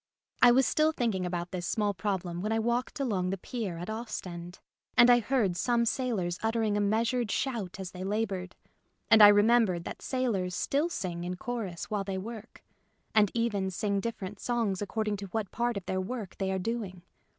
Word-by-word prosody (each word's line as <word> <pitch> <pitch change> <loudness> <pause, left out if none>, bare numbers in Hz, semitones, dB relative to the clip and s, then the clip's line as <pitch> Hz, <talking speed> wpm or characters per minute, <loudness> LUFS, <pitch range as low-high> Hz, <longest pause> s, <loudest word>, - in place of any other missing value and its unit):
I 245 - +9
was 255 +2 +5
still 310 +1 +3
thinking 220 -11 -1
about 175 0 -3
this 175 -2 -4
small 210 -2 0
problem 180 -3 -3
when 215 +3 -2
I 225 - +2
walked 240 +5 -1
along 200 -9 0
the 195 - -2
pier 200 -3 -4
at 175 - -6
Ostend; 185 -6 -6 0.4
and 240 +1 +8
I 240 - +6
heard 225 -6 +1
some 235 +5 +1
sailors 220 -9 -1
uttering 225 -2 +1
a - - +1
measured 225 +3 +1
shout 220 -8 -2
as 190 -2 -5
they 185 0 -7
laboured, 195 -2 -2 0.6
and 220 - +8
I 205 - +12
remembered 205 -3 +4
that - - -7
sailors 210 -9 -1
still 295 +5 0
sing 175 - -4
in 180 +1 -3
chorus 210 -5 -5
while 205 -2 0
they 195 -1 -3
work, 220 +3 -8 0.5
and 210 -2 +5
even 210 -5 0
sing 200 +2 -1
dif 230 +3 -3
ferent 195 0 -7
songs 230 -6 -1
according 210 0 -1
to 200 0 -6
what 210 0 -3
part 240 -2 -1
of 195 - -6
their 185 0 -1
work 210 -1 -5
they 190 -1 0
are 190 - 0
doing. 190 -3 -4
205 Hz, 195 wpm, -29 LUFS, 185-235 Hz, 0.6 s, I